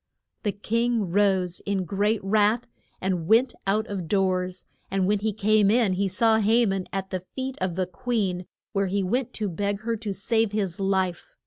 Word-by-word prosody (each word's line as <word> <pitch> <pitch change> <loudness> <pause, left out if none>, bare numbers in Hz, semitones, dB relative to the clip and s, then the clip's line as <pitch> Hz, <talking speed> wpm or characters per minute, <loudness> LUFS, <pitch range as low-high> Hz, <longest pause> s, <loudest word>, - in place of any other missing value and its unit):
The 210 - 0
king 225 -1 0
rose 190 -2 +2
in 195 -2 -2
great 205 +4 0
wrath 215 +4 +2 0.4
and 180 -4 -1
went 235 +4 +4
out 215 +3 +2
of 195 -6 -5
doors, 185 -1 0 0.2
and 195 -1 +1
when 205 +2 +2
he 215 +2 0
came 210 0 +3
in 220 -3 +3
he 195 +2 0
saw 220 +4 +3
Ha 225 +3 +4
man 195 -3 -1
at 195 0 -4
the 185 - -1
feet 260 +8 -6
of 185 -2 -1
the 185 0 0
queen, 185 -3 -2 0.3
where 195 -1 +1
he 195 +1 0
went 245 +6 -1
to 215 - -2
beg 200 +3 -2
her 230 +1 -1
to 210 -1 -4
save 220 +2 0
his 195 -4 -1
life. 190 -2 -1
200 Hz, 190 wpm, -25 LUFS, 185-220 Hz, 0.4 s, went